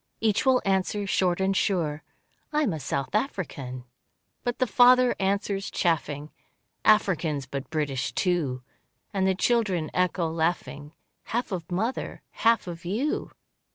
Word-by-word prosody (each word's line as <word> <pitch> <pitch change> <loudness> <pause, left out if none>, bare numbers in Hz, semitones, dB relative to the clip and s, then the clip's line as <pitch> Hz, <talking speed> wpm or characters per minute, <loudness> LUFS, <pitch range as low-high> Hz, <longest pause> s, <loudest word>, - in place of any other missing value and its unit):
Each 220 +3 +1
will 260 -1 +4
answer, 195 +1 +1
short 185 -2 +1
and 190 0 +1
sure, 160 -7 0 0.5
"I 300 0 +2
am 210 - +1
a 160 - -4
South 135 +1 -3
African." 145 - -3 0.6
But 245 0 -1
the 255 - +2
father 250 +2 +5
answers, 195 0 0
chaffing, 150 -3 -1 0.5
"Africans 170 -9 +3
but 135 +1 -6
British 145 -4 -1
too." 155 -9 0 0.5
And 190 -1 +1
the 190 - +2
children 195 -7 +1
echo, 180 -1 +1
laughing, 160 -2 -2 0.3
"Half 240 0 -2
of 180 -2 -4
mother 220 +8 -2
half 230 -1 +2
of 170 -2 -7
you." 220 - -1
185 Hz, 135 wpm, -26 LUFS, 155-215 Hz, 0.6 s, father